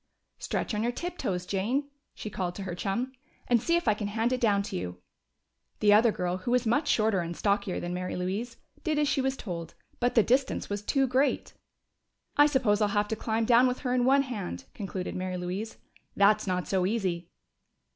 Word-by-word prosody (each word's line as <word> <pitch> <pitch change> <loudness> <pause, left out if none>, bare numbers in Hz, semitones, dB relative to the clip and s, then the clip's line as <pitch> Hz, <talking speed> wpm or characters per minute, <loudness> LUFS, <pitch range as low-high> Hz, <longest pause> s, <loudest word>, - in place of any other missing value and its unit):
"Stretch - - -2
on 210 - 0
your 235 +2 +1
tiptoes, 245 - -3
Jane," 230 +10 -1 0.3
she 215 - -6
called 180 -2 -3
to 200 - -5
her 185 -2 -4
chum, 220 +8 -2 0.4
"and 240 -2 +3
see 335 +6 +2
if 345 -6 0
I 215 - +6
can 205 0 -4
hand 225 +4 0
it 255 - -2
down 205 -4 +3
to - - -6
you." 90 0 -4 0.8
The 205 -1 +5
other 220 +2 +6
girl, 180 -2 -2
who 185 +6 -5
was 250 0 +2
much 285 +7 +2
shorter 215 -6 +3
and 170 0 -4
stockier 200 -2 0
than 175 0 -4
Mary 180 0 -3
Louise, 200 +7 -3 0.3
did 315 -3 0
as 295 -1 +2
she 280 -1 +1
was 265 0 -1
told, 170 -5 -6 0.2
but 245 0 +1
the 225 - +6
distance 260 -2 +1
was 205 0 -2
too 270 +6 +2
great. 260 +3 +1 0.8
"I 290 0 +7
suppose 245 -8 +2
I'll 210 - +4
have 205 0 0
to 220 - 0
climb 225 +1 -1
down 240 +2 +6
with 250 0 -2
her 250 -2 -1
in 250 -1 +2
one 275 +2 +5
hand," 205 - -5
concluded 190 -2 -5
Mary 185 0 -3
Louise. 185 +5 -4 0.4
"That's 210 +1 +4
not 180 -4 -1
so 185 -2 +1
easy." 185 -6 -1
215 Hz, 205 wpm, -28 LUFS, 185-250 Hz, 0.8 s, I